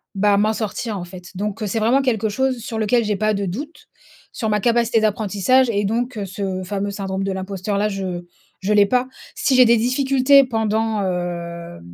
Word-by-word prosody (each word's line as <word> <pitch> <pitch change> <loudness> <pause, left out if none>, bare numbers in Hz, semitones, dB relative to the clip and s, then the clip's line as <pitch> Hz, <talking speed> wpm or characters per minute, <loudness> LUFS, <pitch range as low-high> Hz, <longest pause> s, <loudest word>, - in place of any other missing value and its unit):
bah 200 0 +3
m'en 215 +2 +2
sortir 220 0 -3
en 175 - -6
fait. 180 0 -11
Donc 210 +3 -3
c'est 215 +3 -1
vraiment 235 +5 +3
quelque 220 -4 0
chose 260 +3 0
sur 225 0 -5
lequel 225 +2 +2
j'ai 210 -1 0
pas 215 +2 +1
de 200 -1 -2
doute, 290 - -7 0.4
sur 220 -3 -3
ma 210 0 +1
capacité 235 +1 +2
d'apprentissage 215 +4 +2
et 205 -1 0
donc 235 +2 -2
ce 190 0 -4
fameux 200 +1 -3
syndrome 195 -1 -3
de 195 - -1
l'imposteur 190 +1 -3
là, 210 - +2
je 185 -3 -4 0.3
je 205 +2 0
l'ai 205 -1 +6
pas! 250 +4 +1 0.3
Si 265 - +1
j'ai 255 0 +7
des 235 0 +5
difficultés 270 +3 +4
pendant, 220 -3 0
heu, 170 - -4
210 Hz, 190 wpm, -21 LUFS, 195-235 Hz, 0.4 s, j'ai